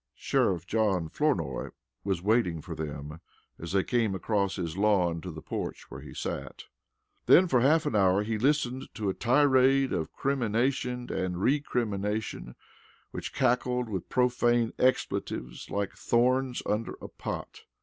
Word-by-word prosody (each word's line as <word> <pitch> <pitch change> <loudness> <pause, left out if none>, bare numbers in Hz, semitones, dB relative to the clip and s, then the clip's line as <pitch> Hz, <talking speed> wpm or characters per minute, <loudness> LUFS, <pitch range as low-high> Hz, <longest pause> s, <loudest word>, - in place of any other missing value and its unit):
Sheriff 90 -3 0
John 95 -6 +1
Flournoy 145 - -1 0.3
was 95 -3 -1
waiting 100 -6 +2
for 80 +2 -7
them 75 0 -6 0.4
as 85 - -6
they 95 0 +2
came 115 -5 0
across 100 -1 0
his 85 -3 -4
lawn 95 -5 +2
to 90 - -6
the 80 -2 -8
porch - - -5
where - - -8
he - - -10
sat. - - -5 0.6
Then 185 - +7
for 125 -7 +3
half 150 +5 +4
an - - -1
hour 95 0 +4
he 110 0 -2
listened 130 -1 0
to 105 -2 -2
a - - 0
tirade 135 +2 +3
of 80 -3 -2
crimination 125 -1 -1
and 90 -1 -2
recrimination 105 - -1 0.6
which - - -5
crackled 125 0 +1
with 95 -5 -4
profane 120 -2 +2
expletives 60 - -1
like 100 -1 -2
thorns 125 +2 +1
under 105 +2 -1
a - - -8
pot. - - -6
110 Hz, 145 wpm, -28 LUFS, 95-125 Hz, 0.6 s, Then